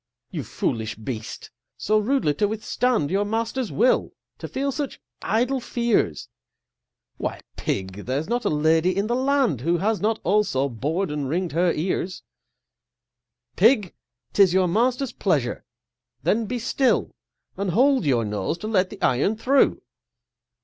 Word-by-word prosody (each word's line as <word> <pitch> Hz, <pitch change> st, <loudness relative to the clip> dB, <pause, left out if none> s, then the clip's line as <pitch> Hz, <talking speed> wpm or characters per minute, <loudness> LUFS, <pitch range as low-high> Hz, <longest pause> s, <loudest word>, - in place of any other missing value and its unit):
You -, -, -3 dB
foolish 110 Hz, -1 st, -2 dB
beast, 110 Hz, 0 st, -7 dB, 0.3 s
so 215 Hz, +1 st, +2 dB
rudely 220 Hz, -, +1 dB
to 205 Hz, +8 st, +1 dB
withstand 220 Hz, -, 0 dB
Your 200 Hz, +2 st, +2 dB
master's 225 Hz, +3 st, -2 dB
will, 245 Hz, +4 st, +2 dB, 0.3 s
to -, -, -6 dB
feel 275 Hz, +1 st, -2 dB
such 280 Hz, 0 st, -4 dB, 0.2 s
idle 250 Hz, +4 st, +1 dB
fears! 235 Hz, -, 0 dB, 0.9 s
Why, -, -, -4 dB
Pig, 95 Hz, +1 st, -3 dB
there's 140 Hz, +5 st, -1 dB
not 240 Hz, +2 st, -1 dB
a -, -, +1 dB
Lady 160 Hz, +4 st, +2 dB
in 200 Hz, -, +1 dB
the 240 Hz, +2 st, 0 dB
land 260 Hz, -, +1 dB
Who 170 Hz, +5 st, +1 dB
has 210 Hz, +4 st, 0 dB
not 220 Hz, +2 st, +1 dB
also 180 Hz, -8 st, +2 dB
bor'd 150 Hz, -, -2 dB
and 145 Hz, -3 st, -3 dB
ring'd 175 Hz, +3 st, -1 dB
her 170 Hz, +2 st, +2 dB
ears. 180 Hz, +2 st, -2 dB, 1.3 s
Pig! 210 Hz, -2 st, +4 dB, 0.4 s
'tis 190 Hz, -3 st, +5 dB
your 185 Hz, -1 st, +4 dB
master's 245 Hz, +7 st, +1 dB
pleasureâthen 220 Hz, 0 st, -2 dB
be 245 Hz, -, -2 dB
still, 255 Hz, +2 st, +1 dB, 0.4 s
And 200 Hz, -1 st, -2 dB
hold 260 Hz, +7 st, +3 dB
your 125 Hz, -6 st, +2 dB
nose 105 Hz, -, -2 dB
to 215 Hz, -, -6 dB
let 190 Hz, -4 st, +2 dB
the 210 Hz, -, -10 dB
iron 140 Hz, -, +2 dB
through! 265 Hz, +5 st, +2 dB
200 Hz, 145 wpm, -24 LUFS, 155-235 Hz, 1.3 s, tis